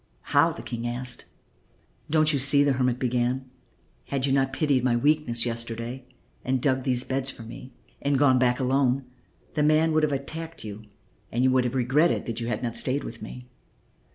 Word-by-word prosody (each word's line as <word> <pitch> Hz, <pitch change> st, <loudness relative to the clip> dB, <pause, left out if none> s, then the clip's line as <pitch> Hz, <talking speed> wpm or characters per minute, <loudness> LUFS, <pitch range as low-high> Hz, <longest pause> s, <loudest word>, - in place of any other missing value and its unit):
"How?" -, -, +5 dB
the -, -, -9 dB
King 120 Hz, 0 st, -4 dB
asked. 125 Hz, +1 st, -3 dB, 0.8 s
"Don't 155 Hz, 0 st, +4 dB
you 140 Hz, -, +1 dB
see?" 140 Hz, +2 st, +5 dB
the 140 Hz, -1 st, +3 dB
hermit 125 Hz, -1 st, +1 dB
began; 125 Hz, +1 st, 0 dB, 0.6 s
"had 135 Hz, -1 st, -1 dB
you 135 Hz, -, 0 dB
not 135 Hz, -1 st, +2 dB
pitied 135 Hz, -2 st, +1 dB
my 125 Hz, -2 st, +2 dB
weakness 125 Hz, -3 st, +2 dB
yesterday 115 Hz, +2 st, -4 dB, 0.4 s
and 130 Hz, 0 st, 0 dB
dug 130 Hz, 0 st, +1 dB
these 125 Hz, -1 st, +1 dB
beds 135 Hz, 0 st, -1 dB
for 120 Hz, -, -7 dB
me 120 Hz, +3 st, -10 dB, 0.3 s
and 140 Hz, -1 st, +1 dB
gone 130 Hz, -2 st, +4 dB
back 125 Hz, -1 st, +2 dB
alone, 130 Hz, 0 st, +1 dB, 0.5 s
the 150 Hz, -, 0 dB
man 155 Hz, +2 st, +3 dB
would 155 Hz, 0 st, +3 dB
have 155 Hz, -1 st, +1 dB
attacked 160 Hz, +4 st, -5 dB
you 105 Hz, 0 st, -8 dB, 0.5 s
and 120 Hz, +2 st, 0 dB
you 130 Hz, -, +4 dB
would 130 Hz, -1 st, +3 dB
have 125 Hz, +1 st, -2 dB
regretted 135 Hz, +7 st, +2 dB
that 115 Hz, -1 st, -4 dB
you 115 Hz, -, -3 dB
had 120 Hz, -, -2 dB
not 115 Hz, -1 st, -2 dB
stayed 135 Hz, +3 st, +2 dB
with 115 Hz, -, -8 dB
me. 125 Hz, 0 st, -9 dB
130 Hz, 190 wpm, -26 LUFS, 120-140 Hz, 0.8 s, How